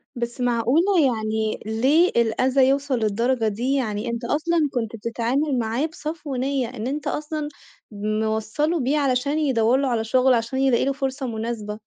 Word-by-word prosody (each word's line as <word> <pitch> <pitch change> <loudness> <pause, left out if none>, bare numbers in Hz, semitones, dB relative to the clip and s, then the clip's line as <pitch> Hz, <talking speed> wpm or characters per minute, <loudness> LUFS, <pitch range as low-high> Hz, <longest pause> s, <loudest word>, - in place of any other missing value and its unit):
بس 240 +1 -4
معقولة! 250 - +2
يعني 220 -3 -1
ليه 265 +11 +3
الأذى 255 +3 +3
يوصل 275 -1 +1
للدرجة 230 +2 +1
دي؟ 235 +6 -1
يعني 220 -4 -2
أنت 235 +1 -4
أصلًا 310 +3 +1
كنت 230 -2 -2
بتتعامل 245 +5 -1
معاه 230 +6 0
بصفو 305 -2 -5
نِيّة 265 0 -1
إن 240 -2 -5
أنت 290 +3 -3
أصلًا 305 0 -3 0.4
موصَّله 220 - -1
بيه 275 +3 +1
علشان 280 +1 +1
يدوَّر 255 -5 +2
له 275 0 0
على 235 -3 0
شغل، 255 +3 +3
عشان 235 +2 -1
يلاقي 265 -2 +3
له 275 - +1
فرصة 270 -1 -3
مناسبة. 220 -2 -4
250 Hz, 155 wpm, -23 LUFS, 225-280 Hz, 0.4 s, ليه